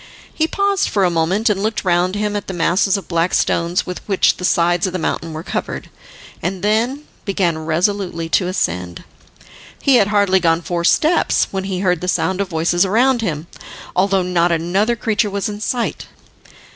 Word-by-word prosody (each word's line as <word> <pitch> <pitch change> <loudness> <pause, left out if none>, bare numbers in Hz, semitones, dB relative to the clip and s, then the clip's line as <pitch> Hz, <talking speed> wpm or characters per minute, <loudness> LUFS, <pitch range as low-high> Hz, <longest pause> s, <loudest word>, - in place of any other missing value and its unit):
He 315 - +1
paused 400 +2 0
for 200 - +1
a 175 - +2
moment 170 +7 +1
and 205 -3 +1
looked 215 -1 -2
round 180 +1 +2
him 210 0 -1
at 205 - -4
the 190 - -5
masses 185 +4 +2
of 195 - -8
black 170 0 0
stones 170 +1 +1
with 180 - -6
which 195 -3 +2
the - - -8
sides 175 +1 +2
of 185 - -5
the - - -1
mountain 165 -1 -3
were 155 +1 -6
covered, - - -5 0.5
and 185 +2 -3
then 235 +7 0 0.2
began 190 -5 0
resolutely 170 +1 -1
to 180 +2 +2
ascend. 90 - -2 0.8
He 270 -3 +4
had 200 - +3
hardly 200 -2 +3
gone 165 -1 +1
four 170 0 -2
steps 315 - +2
when 190 -1 -3
he 190 -1 -3
heard 180 -3 +1
the 180 - -4
sound 190 +1 0
of 195 - -3
voices 170 +2 +1
around 240 +6 +2
him, 160 -7 -3 0.5
although 195 0 +2
not 175 -1 +1
another 185 +8 +1
creature 220 -2 0
was 200 0 -2
in 210 0 -6
sight. 240 +2 -2
190 Hz, 185 wpm, -18 LUFS, 170-210 Hz, 0.8 s, He